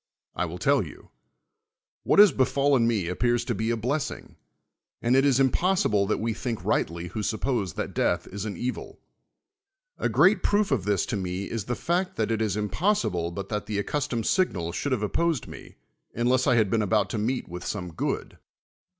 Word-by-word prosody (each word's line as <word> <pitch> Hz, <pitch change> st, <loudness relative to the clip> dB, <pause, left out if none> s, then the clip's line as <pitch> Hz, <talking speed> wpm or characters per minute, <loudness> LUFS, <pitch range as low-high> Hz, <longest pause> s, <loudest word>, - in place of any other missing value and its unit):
I -, -, 0 dB
will -, -, -6 dB
tell -, -, +3 dB
yon: -, -, -12 dB, 0.9 s
what -, -, +1 dB
has 205 Hz, -2 st, +9 dB
befallen 135 Hz, -2 st, +2 dB
n^c 105 Hz, -7 st, 0 dB
appears 120 Hz, +6 st, 0 dB
to 120 Hz, -, -1 dB
be 110 Hz, +2 st, -2 dB
a 120 Hz, -, 0 dB
blessing; 130 Hz, +6 st, -3 dB, 0.6 s
and 120 Hz, +2 st, +2 dB
it 135 Hz, -, +5 dB
is 135 Hz, -2 st, +3 dB
impossible 135 Hz, -, +2 dB
that 110 Hz, -, +1 dB
we 115 Hz, 0 st, -1 dB
think 115 Hz, 0 st, -4 dB
rightly 85 Hz, +1 st, -1 dB
who 105 Hz, +5 st, -4 dB
suppose 110 Hz, -, -1 dB
that -, -, -4 dB
death -, -, 0 dB
is 100 Hz, 0 st, -6 dB
an 105 Hz, -, -5 dB
evil. 125 Hz, +1 st, -5 dB, 1.0 s
A -, -, 0 dB
great 190 Hz, +1 st, +4 dB
])roof 205 Hz, -3 st, +2 dB
of 115 Hz, -9 st, +1 dB
this 100 Hz, -3 st, +1 dB
to -, -, -3 dB
me 95 Hz, -1 st, -3 dB
is 115 Hz, -4 st, -3 dB
the 120 Hz, -, -2 dB
fact 180 Hz, +6 st, -1 dB
that -, -, -1 dB
it 110 Hz, -1 st, 0 dB
is 105 Hz, -2 st, 0 dB
impossible 105 Hz, -, 0 dB
but 95 Hz, +3 st, -6 dB
that 105 Hz, -1 st, -3 dB
the 105 Hz, -, -2 dB
accustomed 125 Hz, +1 st, -2 dB
signal 90 Hz, -, +1 dB
should 145 Hz, -, -3 dB
have 125 Hz, -5 st, 0 dB
opposed 165 Hz, +5 st, 0 dB
me, -, -, -11 dB, 0.4 s
un 120 Hz, -, -1 dB
less 130 Hz, +2 st, +2 dB
I 125 Hz, -, +4 dB
had 110 Hz, -4 st, +2 dB
been 115 Hz, -, +2 dB
about 105 Hz, -1 st, +1 dB
to 110 Hz, -, -2 dB
meet 125 Hz, +4 st, -1 dB
Avith 90 Hz, +1 st, -7 dB
some 90 Hz, -4 st, -4 dB
good. -, -, -3 dB
115 Hz, 195 wpm, -26 LUFS, 100-135 Hz, 1.0 s, has